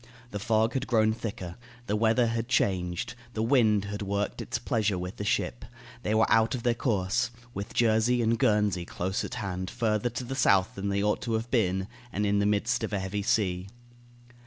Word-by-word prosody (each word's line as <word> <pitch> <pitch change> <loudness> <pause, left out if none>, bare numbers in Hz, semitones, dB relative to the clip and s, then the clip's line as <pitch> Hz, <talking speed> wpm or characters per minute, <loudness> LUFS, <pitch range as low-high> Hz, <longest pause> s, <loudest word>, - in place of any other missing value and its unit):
The 105 - -4
fog 110 +1 +2
had 135 0 -2
grown 110 -2 +3
thicker; 95 -6 -6 0.3
the 105 - 0
weather 115 +3 +3
had 115 0 -1
changed; 90 -6 0 0.2
the 110 - 0
wind 110 -5 +3
had 105 +1 -5
worked 100 0 -2
its - - -2
pleasure 105 -4 0
with 90 +4 -5
the - - -4
ship; 120 +2 -1 0.4
they 110 -2 0
were 110 - +5
out 115 +2 +3
of 120 - -6
their 120 - +3
course, 115 -1 0 0.2
with 100 +1 -6
Jersey 115 +1 +3
and 115 0 +1
Guernsey 105 -4 +2
close 90 +2 -3
at - - -5
hand, 95 -2 -3
further 115 0 0
to 120 +2 -5
the 125 +2 -5
south 100 -8 +3
than 100 +1 -3
they 100 0 0
ought 105 0 +1
to 115 - -2
have 110 +2 -2
been, 95 -5 +1 0.2
and 105 +1 -1
in 100 0 +2
the 100 - +2
midst 110 +4 +1
of 110 - -3
a 100 - +1
heavy 95 +2 -3
sea. 95 -3 0
105 Hz, 205 wpm, -28 LUFS, 100-115 Hz, 0.4 s, were